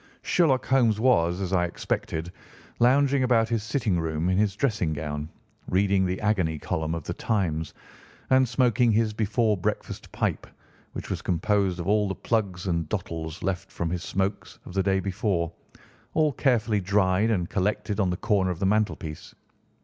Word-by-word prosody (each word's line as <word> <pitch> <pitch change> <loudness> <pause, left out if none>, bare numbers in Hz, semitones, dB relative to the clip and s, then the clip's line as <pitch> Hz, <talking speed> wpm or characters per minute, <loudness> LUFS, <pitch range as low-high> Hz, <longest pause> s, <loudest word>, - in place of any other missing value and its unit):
Sherlock 150 -7 +2
Holmes 120 -5 +3
was, 90 -8 +3
as 95 0 -2
I 90 -2 +3
expected, 85 -1 -3 0.5
lounging 135 +3 +4
about 120 -3 +3
his 115 -2 0
sitting 110 -5 0
room 80 +1 -1
in 95 - +2
his 105 -2 +1
dressing 105 - 0
gown, 75 0 -4 0.4
reading 95 0 +2
the 90 +1 -2
agony 95 -7 +1
column 80 +2 -2
of 80 - -5
The - - -4
Times 80 -8 -1 0.6
and 130 -1 +5
smoking 120 -1 +3
his 110 0 +2
before 110 +1 +1
breakfast 90 - -4
pipe, - - -2 0.5
which - - -6
was - - -2
composed 95 +1 0
of 85 - -4
all 105 0 +3
the 95 - -3
plugs 100 -6 -1
and 85 -4 -1
dottles 80 -5 -4
left 95 -2 -2
from 85 -1 -3
his 90 -1 -2
smokes 95 -1 -3
of - - -9
the 95 - +1
day 95 0 +1
before, 95 -3 -1 0.6
all 155 -2 +3
carefully 115 -6 +1
dried 95 +2 +2
and 90 -6 0
collected 105 +1 -1
on 95 -3 +2
the 90 - -1
corner 100 -3 +1
of 90 - -2
the 95 - -1
mantelpiece. 100 -7 -1
100 Hz, 170 wpm, -26 LUFS, 90-110 Hz, 0.6 s, and